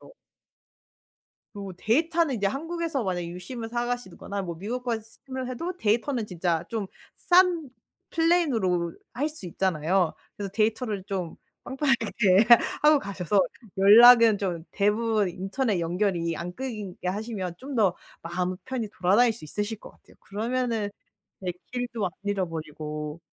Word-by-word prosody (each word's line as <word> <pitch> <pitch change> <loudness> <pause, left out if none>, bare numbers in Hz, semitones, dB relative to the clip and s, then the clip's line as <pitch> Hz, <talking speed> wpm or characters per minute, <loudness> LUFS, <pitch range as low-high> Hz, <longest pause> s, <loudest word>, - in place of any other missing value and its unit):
같아요. - - -15 1.4
그리고 200 -3 -7
데이터는 315 - +2
이제 200 -2 +1
한국에서 325 - -2
만약 180 -3 -1
유심을 180 +7 -6
사가시거나 240 -5 -3
뭐 175 -3 -5
미국 240 +7 -4
가서 235 -3 -1
유심을 260 +3 -7
해도 335 +8 -4
데이터는 230 0 0
진짜 170 -3 -1
좀 215 -4 -3 0.3
싼 350 -5 +3 0.4
플랜으로 240 - +2 0.2
할 285 +4 0
수 305 -11 -10
있잖아요. 175 0 +1 0.2
그래서 200 -2 -5
데이터를 215 -1 0
좀 190 -5 -4 0.3
빵빵하게 235 -7 +2 0.4
하고 300 -1 +6
가셔서 195 - 0 0.4
연락은 225 +2 +8
좀 180 -5 -3
대부분 210 0 +1
인터넷 195 +4 -1
연결이 170 -1 0
안 175 +1 -5
끊기게 215 -9 -5
하시면 195 -3 -3
좀 275 +1 -7
더 200 -6 +3 0.3
마음 180 +2 -2
편히 245 -5 -3
돌아다닐 210 +6 +3
수 220 - -13
있으실 210 +7 -4
것 - - -12
같아요. - - -23
그러면은 230 0 -2 0.5
네 185 -2 -2 0.2
길도 240 -4 -2
안 180 - -2
잃어버리고. 155 -5 -4
210 Hz, 315 characters per minute, -26 LUFS, 185-245 Hz, 1.4 s, 연락은